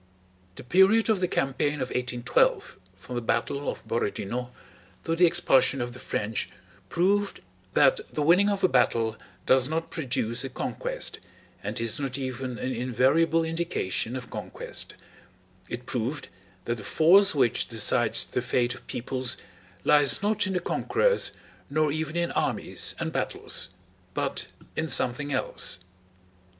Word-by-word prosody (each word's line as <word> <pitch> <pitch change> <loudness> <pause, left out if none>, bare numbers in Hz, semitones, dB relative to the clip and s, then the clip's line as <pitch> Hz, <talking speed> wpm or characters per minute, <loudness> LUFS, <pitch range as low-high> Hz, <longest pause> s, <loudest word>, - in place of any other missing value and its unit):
The - - -9
period 190 - +4
of 210 - +1
the 180 - +1
campaign 140 0 0
of 130 -3 -3
1812 125 -1 +1 0.2
from 95 +7 -10
the 120 - -2
battle 140 +4 -1
of - - -7
Borodinó 120 +2 -2 0.5
to 165 - 0
the 175 +1 +6
expulsion 140 -5 +3
of 120 0 -3
the 125 - -11
French 110 -3 -2 0.4
proved 200 +3 +1 0.3
that 135 -2 +5
the 150 - -1
winning 180 +6 +5
of 200 -1 -1
a - - +7
battle 115 -9 +2 0.3
does 130 +1 +4
not 165 +1 -2
produce 125 -5 -1
a 135 - -4
conquest - - -3 0.4
and - - -4
is 115 +1 0
not 135 -2 -3
even 130 -2 -4
an 130 +1 -3
invariable 130 +7 +2
indication 160 - -1
of 125 -2 -7
conquest; - - -6 0.7
it 120 +1 -6
proved 125 +5 -3 0.4
that 120 0 -1
the 105 - -9
force 190 - +5
which 125 -5 +2
decides 115 0 +3
the - - -2
fate 120 -1 +1
of - - -13
peoples 130 +1 -3 0.5
lies 150 +4 +5
not 210 0 +2
in 190 - -2
the 180 - +1
conquerors, 485 - +1 0.4
nor 155 +1 +1
even 155 +1 -3
in 170 0 0
armies - - -1
and - - -3
battles, - - -3 0.5
but - - -2 0.3
in 160 - -1
something 130 +1 +1
else. 130 -8 0
135 Hz, 145 wpm, -27 LUFS, 125-165 Hz, 0.7 s, a